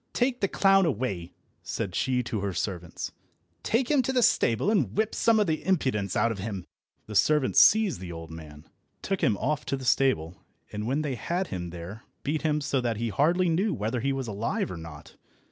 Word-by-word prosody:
Take 250 Hz, 0 st, 0 dB
the 195 Hz, -, +3 dB
clown 195 Hz, -1 st, +4 dB
away," 100 Hz, -, -2 dB, 0.3 s
said 90 Hz, -, -4 dB
she 125 Hz, +4 st, 0 dB
to 115 Hz, -2 st, -3 dB
her 100 Hz, -1 st, -2 dB
servants. 90 Hz, -1 st, -4 dB, 0.5 s
"Take 245 Hz, +4 st, 0 dB
him 290 Hz, -3 st, +4 dB
to 255 Hz, -, -1 dB
the 250 Hz, -2 st, +2 dB
stable, 120 Hz, -, +3 dB
and 140 Hz, -, 0 dB
whip 220 Hz, -1 st, +1 dB
some 230 Hz, -1 st, +3 dB
of 210 Hz, -, +3 dB
the 160 Hz, -3 st, -1 dB
impudence 130 Hz, -, 0 dB
out 115 Hz, -, +2 dB
of 105 Hz, -, -5 dB
him." 95 Hz, -3 st, -5 dB, 0.4 s
The 105 Hz, -, -8 dB
servants 135 Hz, +4 st, +4 dB
seized 215 Hz, +4 st, +5 dB
the 90 Hz, -1 st, -7 dB
old 80 Hz, -1 st, -8 dB
man, 75 Hz, -2 st, -11 dB, 0.4 s
took 195 Hz, -1 st, -2 dB
him 105 Hz, -4 st, +2 dB
off 150 Hz, +6 st, -1 dB
to 135 Hz, -, -1 dB
the 130 Hz, -, -8 dB
stable, 90 Hz, -10 st, +1 dB, 0.3 s
and 105 Hz, +1 st, -4 dB
when 140 Hz, +5 st, 0 dB
they 145 Hz, -3 st, -2 dB
had 170 Hz, -, -2 dB
him 90 Hz, -2 st, -4 dB
there 90 Hz, +5 st, -8 dB, 0.2 s
beat 150 Hz, +2 st, -1 dB
him 150 Hz, -1 st, 0 dB
so 140 Hz, -2 st, 0 dB
that 115 Hz, -3 st, -1 dB
he 115 Hz, +1 st, -2 dB
hardly 170 Hz, -, +2 dB
knew 190 Hz, +6 st, +1 dB
whether 110 Hz, +4 st, -2 dB
he 135 Hz, +4 st, 0 dB
was 135 Hz, -2 st, -3 dB
alive 105 Hz, -2 st, -2 dB
or 90 Hz, -, -6 dB
not. 80 Hz, -3 st, -11 dB
125 Hz, 210 wpm, -27 LUFS, -, 0.5 s, seized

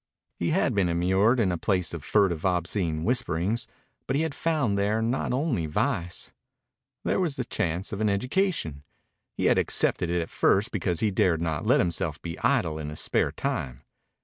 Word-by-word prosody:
He -, -, 0 dB
had -, -, +2 dB
been 95 Hz, -3 st, +2 dB
immured 95 Hz, +8 st, +3 dB
in 100 Hz, -5 st, +2 dB
a 85 Hz, -, -2 dB
place 90 Hz, -4 st, 0 dB
of 85 Hz, -4 st, -6 dB
furtive, 95 Hz, -7 st, +2 dB
obscene 85 Hz, -3 st, 0 dB
whisperings, 115 Hz, -2 st, 0 dB, 0.4 s
but 130 Hz, -, 0 dB
he 150 Hz, -, +2 dB
had 160 Hz, -3 st, -2 dB
found 150 Hz, -12 st, 0 dB
there 100 Hz, +2 st, +1 dB
not 115 Hz, +4 st, -1 dB
only 125 Hz, -, 0 dB
vice. 85 Hz, +3 st, -2 dB, 0.7 s
There -, -, +1 dB
was 170 Hz, -7 st, 0 dB
the 125 Hz, -, -3 dB
chance 90 Hz, 0 st, -2 dB
of 100 Hz, -, -3 dB
an 110 Hz, -, +2 dB
education. 125 Hz, -, -1 dB, 0.5 s
He -, -, -1 dB
had -, -, +4 dB
accepted 90 Hz, -, +1 dB
it 85 Hz, 0 st, +1 dB
at -, -, -11 dB
first 105 Hz, +6 st, +2 dB
because 90 Hz, -4 st, -1 dB
he 110 Hz, -2 st, +2 dB
dared 90 Hz, -3 st, +2 dB
not 80 Hz, -3 st, -2 dB
let -, -, +5 dB
himself 80 Hz, -3 st, -1 dB
be 85 Hz, -1 st, -6 dB
idle 80 Hz, -1 st, +1 dB
in 75 Hz, -1 st, -4 dB
his 75 Hz, -, -5 dB
spare -, -, +1 dB
time. 60 Hz, -2 st, -3 dB
95 Hz, 185 wpm, -27 LUFS, 85-115 Hz, 0.7 s, let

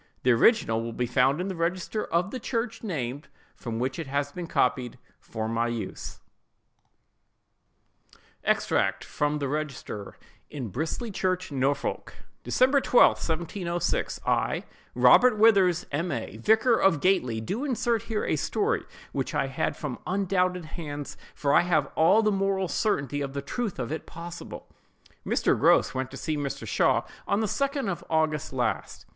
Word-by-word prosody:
The 125 Hz, -, +4 dB
original 115 Hz, -, +4 dB
will 115 Hz, 0 st, -5 dB
be 125 Hz, -, -1 dB
found 130 Hz, +5 st, +2 dB
in 180 Hz, -, -2 dB
the 190 Hz, -, -4 dB
register 180 Hz, +5 st, -2 dB
of 175 Hz, +4 st, 0 dB
the 255 Hz, -, -4 dB
church 235 Hz, 0 st, -3 dB
named, 140 Hz, -, -4 dB, 0.3 s
from 115 Hz, -2 st, -5 dB
which 130 Hz, +6 st, -2 dB
it 160 Hz, -, -4 dB
has 140 Hz, +1 st, -1 dB
been 175 Hz, +2 st, -6 dB
copied 125 Hz, -4 st, 0 dB, 0.2 s
for 110 Hz, -1 st, -5 dB
my 115 Hz, +1 st, 0 dB
use:— 120 Hz, -2 st, -5 dB, 2.2 s
EXTRACT -, -, +1 dB
FROM 150 Hz, 0 st, -1 dB
THE 140 Hz, -2 st, -2 dB
REGISTER 140 Hz, -8 st, -5 dB, 0.3 s
IN 130 Hz, -7 st, -5 dB
BRISLEY 160 Hz, -, -3 dB
CHURCH, 185 Hz, -3 st, -1 dB
NORFOLK. 140 Hz, +1 st, -1 dB, 0.3 s
"DECEMBER 265 Hz, +2 st, +3 dB
12, 250 Hz, -, +5 dB
1706.—I, 170 Hz, +1 st, -1 dB, 0.3 s
Robert 250 Hz, -3 st, +6 dB
Withers, 195 Hz, -6 st, +4 dB
M. 165 Hz, +5 st, -1 dB
A., -, -, -4 dB
vicar 220 Hz, +3 st, +4 dB
of 180 Hz, -6 st, +4 dB
Gately, 135 Hz, -11 st, +2 dB
do 195 Hz, -, -3 dB
insert 240 Hz, -5 st, 0 dB
here 215 Hz, -2 st, -1 dB
a -, -, 0 dB
story 440 Hz, +2 st, 0 dB, 0.3 s
which -, -, -3 dB
I -, -, +2 dB
had -, -, -2 dB
from -, -, -5 dB
undoubted 185 Hz, -2 st, 0 dB
hands; 145 Hz, -3 st, -6 dB, 0.2 s
for 140 Hz, -1 st, +1 dB
I -, -, +7 dB
have 170 Hz, -4 st, +2 dB
all 190 Hz, +8 st, +4 dB
the 215 Hz, -, +3 dB
moral 195 Hz, -1 st, 0 dB
certainty 145 Hz, -, -1 dB
of 140 Hz, -1 st, -4 dB
the 140 Hz, -1 st, -4 dB
truth 225 Hz, -, -3 dB
of 125 Hz, 0 st, -4 dB
it 160 Hz, -, -5 dB
possible:— 170 Hz, +1 st, -8 dB, 0.6 s
"Mr. -, -, +2 dB
Grose -, -, +4 dB
went 130 Hz, -1 st, -2 dB
to 135 Hz, -, -9 dB
see 155 Hz, -, -2 dB
Mr. 145 Hz, -2 st, -4 dB
Shaw -, -, +2 dB, 0.2 s
on 200 Hz, -, +1 dB
the -, -, +1 dB
2d 275 Hz, +4 st, -1 dB
of 185 Hz, -3 st, -3 dB
August 155 Hz, -2 st, 0 dB
last. 125 Hz, -2 st, -2 dB
165 Hz, 155 wpm, -27 LUFS, 140-195 Hz, 2.2 s, I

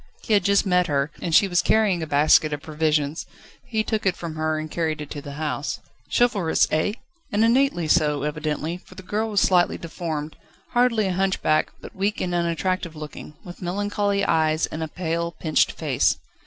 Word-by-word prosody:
He 220 Hz, -, 0 dB
had 200 Hz, -3 st, +4 dB
just 200 Hz, +2 st, +3 dB
met 180 Hz, -1 st, +2 dB
her, 140 Hz, -1 st, 0 dB
and 170 Hz, -3 st, 0 dB
she 200 Hz, -, +6 dB
was 175 Hz, -2 st, +2 dB
carrying 210 Hz, -6 st, +2 dB
a 160 Hz, -, -3 dB
basket 150 Hz, +1 st, +4 dB
of 145 Hz, -, -5 dB
provisions: 155 Hz, -1 st, -1 dB, 0.4 s
he 220 Hz, -1 st, 0 dB
took 220 Hz, -1 st, -2 dB
it 190 Hz, -2 st, +1 dB
from 170 Hz, -2 st, -6 dB
her 155 Hz, 0 st, -1 dB
and 155 Hz, 0 st, -5 dB
carried 160 Hz, -2 st, -1 dB
it 150 Hz, -, -7 dB
to 145 Hz, -, -5 dB
the 140 Hz, 0 st, -8 dB
house. 150 Hz, -1 st, -3 dB, 0.3 s
Chivalrous 205 Hz, -9 st, +2 dB
eh? 155 Hz, +6 st, +1 dB, 0.4 s
and 215 Hz, +1 st, +3 dB
innately 240 Hz, -, +2 dB
so, 150 Hz, -3 st, +2 dB
evidently, 155 Hz, +2 st, -2 dB
for 185 Hz, -, -17 dB
the 190 Hz, -, -10 dB
girl 215 Hz, +4 st, -2 dB
was 205 Hz, -2 st, +2 dB
slightly 180 Hz, -2 st, +3 dB
deformed: 160 Hz, -2 st, -5 dB, 0.3 s
hardly 240 Hz, -3 st, +2 dB
a 190 Hz, -, 0 dB
hunchback, 185 Hz, -4 st, +1 dB
but -, -, -11 dB
weak 200 Hz, +2 st, -1 dB
and 180 Hz, -, -2 dB
unattractive 170 Hz, 0 st, -1 dB
looking, 150 Hz, 0 st, -9 dB
with 175 Hz, +1 st, -11 dB
melancholy 200 Hz, +2 st, 0 dB
eyes, 155 Hz, -1 st, +2 dB
and 160 Hz, -, -6 dB
a 160 Hz, -, -2 dB
pale, 170 Hz, 0 st, -3 dB
pinched 155 Hz, -2 st, +1 dB
face. -, -, +1 dB
170 Hz, 190 wpm, -23 LUFS, 155-200 Hz, 0.4 s, she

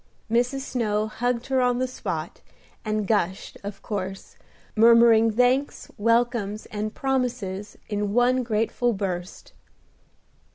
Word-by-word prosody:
Mrs. 245 Hz, +4 st, +1 dB
Snow 215 Hz, -6 st, -1 dB
hugged 235 Hz, +2 st, -2 dB
her 265 Hz, -1 st, +1 dB
on 245 Hz, -1 st, +2 dB
the 255 Hz, +1 st, 0 dB
spot, 255 Hz, -, -5 dB, 0.4 s
and 215 Hz, -1 st, -1 dB
gushed, 190 Hz, -3 st, -1 dB
of 200 Hz, 0 st, -7 dB
course, 195 Hz, -2 st, -5 dB, 0.4 s
murmuring 230 Hz, 0 st, +6 dB
thanks, 250 Hz, +5 st, +1 dB
welcomes, 230 Hz, -2 st, +1 dB
and 215 Hz, +1 st, -4 dB
promises 245 Hz, -7 st, -2 dB
in 205 Hz, -1 st, -2 dB
one 245 Hz, +3 st, +3 dB
grateful 230 Hz, +1 st, 0 dB
burst. 185 Hz, -2 st, -5 dB
230 Hz, 115 wpm, -25 LUFS, 210-245 Hz, 0.4 s, murmuring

